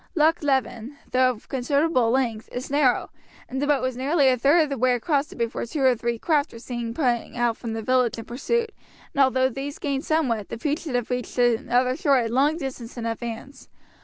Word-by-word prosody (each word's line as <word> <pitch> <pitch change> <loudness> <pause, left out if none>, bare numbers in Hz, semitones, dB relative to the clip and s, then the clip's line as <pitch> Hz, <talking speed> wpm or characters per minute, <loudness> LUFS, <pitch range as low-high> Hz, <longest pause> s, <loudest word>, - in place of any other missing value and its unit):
Loch 320 +1 +3
Leven, 265 -2 -1
though 255 0 +4
of 235 -4 -6
considerable 270 -1 +1
length, 230 -3 -1
is 250 +2 -5
narrow, 280 -3 +2 0.4
and 265 +1 -4
the 290 - 0
boat 285 -3 +2
was 255 -1 -1
nearly 275 +2 +3
a 255 - +3
third 285 +7 +4
of 300 - -3
the 275 - -3
way 255 +1 +3
across 280 +4 0
it - - -10
before 230 -1 -2
two 270 +4 -3
or 260 -2 +5
three 235 0 -2
craft 300 +3 +1
were - - -10
seen 235 -1 -5
putting 245 -2 -1
out 240 -1 +1
from 230 -1 -6
the 225 0 -4
village 255 -1 +2
in 225 - -7
pursuit, 450 - -1 0.4
and 280 - +4
although 260 0 +3
these 275 +3 -5
gained 275 -1 -2
somewhat, 255 -10 0
the - - -5
fugitives 275 -3 -2
reached 250 -1 -3
the 240 -2 +2
other 250 +1 +2
shore 280 0 +3
a 235 -2 +1
long 275 +7 +2
distance 260 -6 -6
in 235 - -4
advance. 230 +3 -6
255 Hz, 215 wpm, -24 LUFS, 235-285 Hz, 0.4 s, or